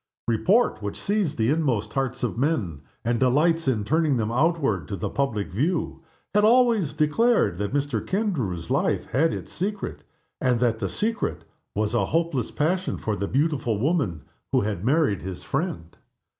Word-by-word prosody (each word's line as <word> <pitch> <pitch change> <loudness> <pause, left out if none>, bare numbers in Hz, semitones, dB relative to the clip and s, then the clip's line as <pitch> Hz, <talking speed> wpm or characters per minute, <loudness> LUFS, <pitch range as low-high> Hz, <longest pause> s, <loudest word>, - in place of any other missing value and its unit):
Report, 180 - +2
which 100 -1 -4
sees 200 -7 0
the 115 +3 +1
inmost 125 -10 0
hearts 135 -1 -2
of 120 - -1
men, 115 - -1 0.2
and 120 0 +1
delights 155 +5 +2
in 115 -6 +1
turning 155 +3 +2
them 110 -1 -1
outward 135 - +1
to 100 - -3
the 90 - -4
public 120 -8 -1
view, 160 - -1 0.3
had 210 0 +4
always 225 - +4
declared 155 - +2
that 100 -1 -2
Mr. 140 -5 -1
Kendrew's 130 - -2
life - - +1
had 160 +5 +3
its - - -6
secret, 200 +2 -4 0.4
and 125 -2 +2
that 115 -2 +1
the 100 -4 -2
secret 225 - -2 0.3
was 105 +2 0
a 120 - +2
hopeless 160 -7 0
passion 180 +5 0
for 110 - -2
the 100 0 -2
beautiful 135 -5 0
woman 130 - 0 0.3
who - - +3
had 100 -3 -3
married 135 - +2
his 95 -1 -6
friend. 85 0 -3
135 Hz, 165 wpm, -25 LUFS, 105-165 Hz, 0.4 s, had